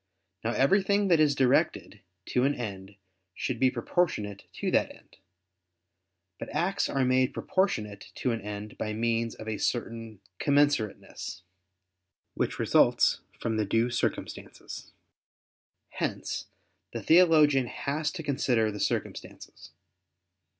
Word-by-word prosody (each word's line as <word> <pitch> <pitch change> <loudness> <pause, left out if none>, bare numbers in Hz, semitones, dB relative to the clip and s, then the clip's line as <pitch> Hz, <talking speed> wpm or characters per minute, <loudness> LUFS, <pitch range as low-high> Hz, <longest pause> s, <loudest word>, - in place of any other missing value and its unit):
Now, 115 +1 0
everything 195 +8 +3
that 170 -3 +5
is 150 -2 +4
directed 130 -4 +1 0.3
to 125 - +2
an 140 +2 +2
end 100 -4 -6 0.4
should 125 -3 -3
be 130 0 +5
proportionate 120 - -1
to - - -2
that - - +2
end. - - -19 1.2
But - - -6
acts 190 +3 0
are 135 -1 +1
made 130 +1 +2
proportionate 105 - -1
to 125 - -1
an 115 -1 -2
end 105 +1 -7
by 110 - -2
means 115 +1 0
of 110 - -10
a 110 -1 -3
certain 115 -3 -3 0.2
commensurateness, 140 -10 0 0.9
which - - -2
results - - +3 0.2
from 110 -1 -1
the 110 - +1
due 115 +4 +1
circumstances. 120 - -4 1.0
Hence - - -3 0.5
the - - -5
theologian 155 -6 +5
has 150 +5 -2
to 170 -3 -6
consider 125 -6 +1
the 105 - -7
circumstances. 75 - -4
125 Hz, 120 wpm, -28 LUFS, 110-145 Hz, 1.2 s, that